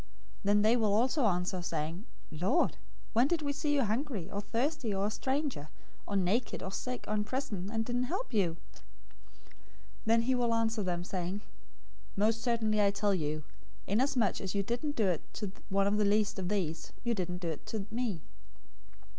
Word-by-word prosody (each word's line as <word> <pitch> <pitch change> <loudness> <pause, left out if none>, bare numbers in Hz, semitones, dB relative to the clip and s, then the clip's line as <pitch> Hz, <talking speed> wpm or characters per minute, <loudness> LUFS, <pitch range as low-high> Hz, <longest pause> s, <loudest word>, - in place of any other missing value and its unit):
025:044 - - -22 0.4
"Then 205 +1 +5
they 220 +2 +5
will 220 -4 +3
also 255 +4 +3
answer, 180 0 0
saying, 165 +3 -3 0.3
'Lord, 180 - +2 0.4
when 240 +4 +5
did 330 0 0
we 285 -1 0
see 290 +1 0
you 275 - +4
hungry, 225 - -2
or 200 - -2
thirsty, 240 +2 -1
or 195 +1 +1
a 210 - 0
stranger, 265 - -1 0.4
or 205 - -2
naked, 200 +6 +1
or 190 - -4
sick, 250 +5 -4
or 215 - -1
in 210 -1 +2
prison, 215 -6 -3
and 225 0 0
didn't 245 +1 0
help 375 - -3
you?' 175 -6 +2 0.2
025:045 - - -24 1.2
"Then 230 +1 +5
he 260 +2 +2
will 240 -2 +2
answer 225 -1 +1
them, 175 -2 -1
saying, 185 +2 -3 0.7
'Most 220 +3 +2
certainly 220 -3 +2
I 200 - +5
tell 200 0 +1
you, 155 -3 -1 0.4
inasmuch 235 0 +2
as 190 0 -3
you 200 - +2
didn't 245 +8 -2
do 220 - +2
it 175 -4 +1
to 205 -3 -3 0.2
one 195 0 +3
of 205 +1 +2
the 210 - +3
least 205 0 +2
of 180 -1 -2
these, 170 -6 -2
you 235 -1 +1
didn't 180 -4 -2
do 175 -2 -3
it 160 - -6
to 215 -3 -3
me.' 225 -8 -1
210 Hz, 190 wpm, -32 LUFS, 190-240 Hz, 1.2 s, Then